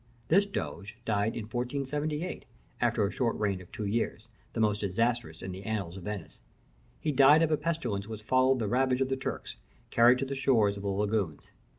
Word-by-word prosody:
This 200 +5 +5
doge 100 - -5
died 105 0 +1
in 115 - -3
1478, 140 +8 -3 0.4
after 120 -3 +2
a 100 - -1
short 120 -3 0
reign 100 -3 0
of 90 - -15
two 105 - -4
years, 110 +1 -2 0.2
the - - -3
most 105 -1 +2
disastrous 115 -3 -1
in 95 - -4
the 95 +1 -7
annals 100 -5 -3
of 95 - -9
Venice. 105 -5 -6 0.6
He 150 - 0
died 145 +3 +7
of 160 - +1
a 155 - +3
pestilence 130 -11 -2
which 110 -1 -7
followed 130 +3 +3
the 110 -4 -1
ravage 130 +2 +2
of 130 - +1
the 135 - +1
Turks, 135 - -5 0.3
carried 120 +2 +6
to 135 - -1
the 135 - -4
shores 120 -7 +3
of 100 - -7
the 100 - -2
lagoons. 100 -5 -1
115 Hz, 200 wpm, -30 LUFS, 100-135 Hz, 0.6 s, died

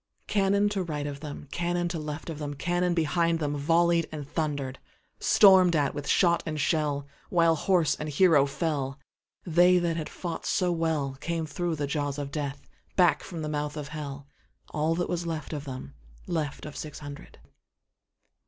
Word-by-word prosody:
Cannon 200 0 +2
to 200 -2 -1
right 150 -5 -3
of 145 -1 -5
them, 145 -1 -8
Cannon 175 0 0
to 170 -2 -3
left 150 +2 -5
of 155 - -7
them, 145 -1 -4
Cannon 175 +3 0
behind 165 +1 +2
themVolley'd 165 +3 +2
and 150 -3 -6
thunder'd; 145 -4 -2 0.4
Storm'd 190 -4 +6
at 145 -2 +2
with 145 -1 -5
shot 170 -2 +4
and 155 -1 -4
shell, 145 -2 0 0.2
While 165 -2 +4
horse 175 -1 +2
and 150 - -5
hero 150 -2 +5
fell, 140 -2 -2 0.5
They 175 +1 +5
that 170 -2 0
had 155 - -4
fought 170 -3 -5
so 180 -2 +2
wellCame 160 0 -1
thro' 170 +2 -2
the 145 -1 -2
jaws 145 0 -2
of 140 -1 -4
Death, 140 -2 -4 0.3
Back 175 -6 +4
from 165 -4 -6
the - - -2
mouth 150 0 -2
of 145 -2 -5
Hell, 145 -3 -6 0.5
All 155 +2 +1
that 175 +1 -1
was 175 -1 -2
left 160 -1 -4
of 145 -1 -4
them, 130 - -7 0.3
Left 155 -5 -3
of 150 - -8
six 150 -1 -6
hundred. 145 -1 -10
155 Hz, 170 wpm, -28 LUFS, 145-170 Hz, 0.5 s, Storm'd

